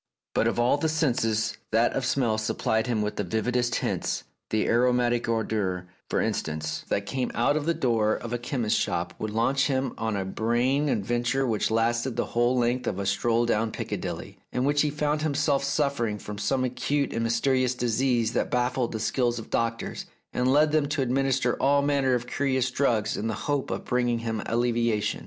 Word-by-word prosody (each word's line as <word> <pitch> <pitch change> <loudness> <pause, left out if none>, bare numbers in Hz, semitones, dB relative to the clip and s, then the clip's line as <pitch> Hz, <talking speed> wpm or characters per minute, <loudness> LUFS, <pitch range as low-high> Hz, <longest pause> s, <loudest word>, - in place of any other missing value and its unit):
But - - +2
of - - 0
all 120 +4 +3
the 160 +2 0
senses, 115 -8 0
that 115 +2 +3
of 130 -2 -1
smell 120 -5 +1
supplied 110 +1 0
him 110 -3 0
with 105 - -3
the - - 0
vividest 120 +5 0
hints: - - -1 0.3
the 110 - +1
aromatic 120 0 +2
odour, 100 -5 -1 0.2
for - - +1
instance, 80 0 -2
that 100 - 0
came 130 +2 -2
out 120 +5 +2
of 155 0 -1
the 170 - +2
door 115 -8 +2
of 115 0 -6
a 120 - -1
chemist's 120 -3 0
shop 85 0 -1
would 110 - -2
launch 120 +5 +1
him 130 -2 -1
on 110 -2 -1
a 95 -1 -2
brain 120 +8 +1
adventure 120 +4 0
which 110 -4 0
lasted 115 +2 +1
the - - 0
whole 120 +2 +2
length 125 +1 +1
of - - -1
a 100 - -3
stroll 115 +4 +1
down 115 -1 +1
Piccadilly, - - -5
in 125 - -1
which 145 +1 +3
he 150 - +2
felt 150 0 -1
himself 145 -2 +1
suffering 140 -6 0
from 105 0 -7
some 130 +3 0
acute 140 +3 -1
and 115 - -1
mysterious 125 +2 +1
disease 120 -1 +1
that - - 0
baffled 125 0 0
the 110 - -3
skill 125 +3 +1
of 120 -2 -6
doctors, 115 0 -2 0.3
and 125 +1 +2
led 150 +2 +4
them 155 -2 +2
to 145 -1 0
administer 130 0 +1
all 140 +1 +4
manner 140 -3 +2
of 120 0 -2
curious 130 -1 0
drugs 115 -6 +1
in 110 - -2
the 110 - -1
hope 145 -2 0
of - - -4
bringing 120 -1 +1
him 115 -2 -3
allevia 115 -2 +1
tion. 105 - -2
120 Hz, 195 wpm, -26 LUFS, 110-135 Hz, 0.3 s, led